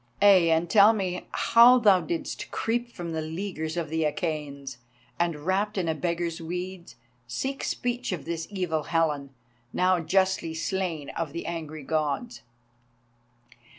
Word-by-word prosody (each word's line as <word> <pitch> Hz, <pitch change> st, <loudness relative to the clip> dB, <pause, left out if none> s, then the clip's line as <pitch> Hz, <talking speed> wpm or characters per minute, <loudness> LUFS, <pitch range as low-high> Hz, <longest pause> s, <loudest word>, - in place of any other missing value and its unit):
Ay, 195 Hz, -4 st, +6 dB
and 165 Hz, +1 st, +2 dB
tell 205 Hz, +4 st, +7 dB
me 185 Hz, -4 st, -3 dB
how 235 Hz, +2 st, +6 dB
thou 205 Hz, -6 st, +5 dB
didst 330 Hz, -3 st, -4 dB
creep 240 Hz, +1 st, -2 dB
from 175 Hz, -5 st, -6 dB
the 160 Hz, -1 st, -2 dB
leaguer 160 Hz, +1 st, -4 dB
of 160 Hz, -3 st, -5 dB
the 160 Hz, 0 st, 0 dB
Achæans, 145 Hz, -3 st, -3 dB, 0.4 s
and, 165 Hz, -3 st, -1 dB
wrapped 200 Hz, +3 st, 0 dB
in 180 Hz, -3 st, 0 dB
a 160 Hz, -, +1 dB
beggar's 170 Hz, +1 st, -2 dB
weeds, 180 Hz, -2 st, -6 dB, 0.3 s
seek 265 Hz, -, -3 dB
speech 245 Hz, -1 st, -2 dB
of 180 Hz, -5 st, -4 dB
this 165 Hz, 0 st, -4 dB
evil 180 Hz, -6 st, -2 dB
Helen, 150 Hz, -4 st, 0 dB, 0.4 s
now 185 Hz, 0 st, +2 dB
justly 185 Hz, 0 st, +1 dB
slain 165 Hz, -4 st, -2 dB
of 160 Hz, -3 st, -4 dB
the 170 Hz, -, -5 dB
angry 155 Hz, -3 st, -5 dB
Gods." 155 Hz, -, -2 dB
170 Hz, 145 wpm, -27 LUFS, 160-195 Hz, 0.4 s, tell